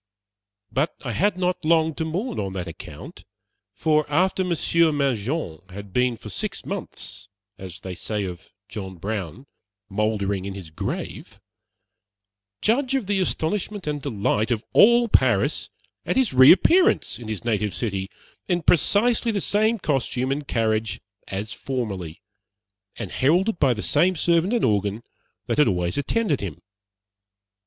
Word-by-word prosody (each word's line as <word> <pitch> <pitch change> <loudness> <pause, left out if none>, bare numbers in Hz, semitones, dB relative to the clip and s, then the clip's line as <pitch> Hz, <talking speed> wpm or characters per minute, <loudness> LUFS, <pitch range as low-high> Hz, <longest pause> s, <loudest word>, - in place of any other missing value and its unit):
But 145 +5 0
I 120 - -2
had 185 - +1
not 180 -1 -1
long 160 0 +3
to 160 - -3
mourn 195 +10 -3
on 95 -1 -3
that 90 -2 -4
account; 85 - -10 0.5
for 155 -1 +1
after 185 +4 +2
Monsieur 170 -2 +2
Mangin 135 - -1
had 100 0 -9
been 125 -1 +1
for 110 - -11
six 95 - -4
months 100 -1 -6 0.3
as 95 -2 -9
they 95 - -6
say 105 +4 -3
of 90 0 -7 0.2
John 95 -2 -7
Brown 100 - -5 0.4
"mouldering 100 -2 -1
in 100 -1 -5
his 90 -5 -9
grave" 80 - -5 1.2
judge 255 +4 +2
of 260 -6 0
the 200 0 0
astonishment 190 +3 -1
and 150 -1 -2
delight 110 -3 0
of 115 -2 -1
all 235 +2 +6
Paris 130 - +2 0.3
at - - -1
his 260 - +2
reappearance 320 - +5
in 120 - -9
his 110 +1 -5
native 105 -3 0
city 100 -4 -2 0.4
in 175 -2 0
precisely 225 +7 +3
the 205 - -1
same 215 +4 +2
costume 135 - -1
and 140 +1 -3
carriage 110 -1 0 0.3
as 100 +2 -4
formerly, 100 -11 -4 0.7
and - - -6
heralded 180 +9 +2
by 135 -3 +4
the 105 - -5
same 175 +5 +3
servant 170 +3 +2
and 240 - +2
organ 105 0 0 0.4
that - - -1
had 150 - +6
always 90 -3 0
attended 150 - 0
him. 95 -7 -5
130 Hz, 145 wpm, -24 LUFS, -, 1.2 s, all